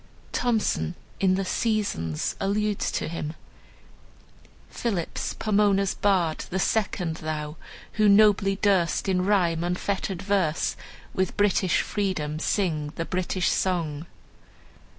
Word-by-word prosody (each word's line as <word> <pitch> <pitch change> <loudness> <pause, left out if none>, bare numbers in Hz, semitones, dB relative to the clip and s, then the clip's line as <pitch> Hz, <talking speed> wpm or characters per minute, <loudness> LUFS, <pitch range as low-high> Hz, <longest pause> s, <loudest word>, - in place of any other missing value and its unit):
Thomson 225 -7 0 0.2
in 185 -1 +3
the 195 0 -1
"Seasons" 195 - -1
alludes 205 +1 0
to - - -1
him: 155 -1 -4 1.3
"Phillips, 200 -8 -3
Pomona's 200 -2 +2
bard, 180 -6 +1
the 190 - -2
second 185 -5 0
thou 155 -1 -4 0.4
Who 215 -1 +4
nobly 200 -1 +5
durst, 195 -3 +1
in 185 -1 +2
rhyme 175 -4 +2
unfettered 185 +1 -2
verse, 190 -6 +1 0.4
With 185 -1 -1
British 195 -3 +3
freedom, 160 -7 -2
sing 160 -5 -1
the 165 - -3
British 185 0 0
song." 165 -4 -1
190 Hz, 110 wpm, -26 LUFS, 165-205 Hz, 1.3 s, nobly